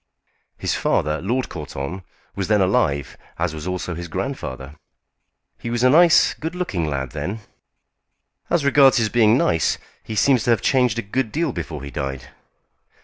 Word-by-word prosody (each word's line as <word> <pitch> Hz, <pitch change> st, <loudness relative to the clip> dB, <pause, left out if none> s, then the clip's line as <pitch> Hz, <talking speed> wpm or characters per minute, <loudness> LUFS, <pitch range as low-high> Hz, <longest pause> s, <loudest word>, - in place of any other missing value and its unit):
His -, -, -1 dB
father, 75 Hz, 0 st, 0 dB
Lord 120 Hz, +8 st, -1 dB
Courton, 75 Hz, +2 st, -6 dB, 0.3 s
was 100 Hz, -2 st, -2 dB
then 105 Hz, -1 st, +3 dB
alive, 70 Hz, -7 st, +1 dB, 0.2 s
as 85 Hz, -1 st, -1 dB
was 80 Hz, +2 st, -6 dB
also 90 Hz, -1 st, -3 dB
his 85 Hz, +1 st, -6 dB
grandfather. 65 Hz, -3 st, -5 dB, 0.9 s
He 115 Hz, -, -5 dB
was 120 Hz, +1 st, -1 dB
a 125 Hz, -, +6 dB
nice, 170 Hz, +2 st, +6 dB
good 160 Hz, +3 st, -6 dB
looking 95 Hz, -, -2 dB
lad 65 Hz, -3 st, -3 dB
then." 80 Hz, +10 st, -4 dB, 1.1 s
"As 170 Hz, -5 st, +1 dB
regards 135 Hz, -1 st, +6 dB
his 115 Hz, -2 st, +2 dB
being 115 Hz, 0 st, +4 dB
nice, 80 Hz, -, +1 dB, 0.3 s
he 110 Hz, -, -6 dB
seems 130 Hz, +4 st, +3 dB
to -, -, 0 dB
have 115 Hz, -5 st, +3 dB
changed 125 Hz, -4 st, +2 dB
a 120 Hz, -, -2 dB
good 115 Hz, +2 st, -2 dB
deal 160 Hz, -1 st, 0 dB
before 80 Hz, -, -6 dB
he 70 Hz, -, -7 dB
died." 70 Hz, -3 st, -5 dB
100 Hz, 165 wpm, -21 LUFS, 75-125 Hz, 1.1 s, a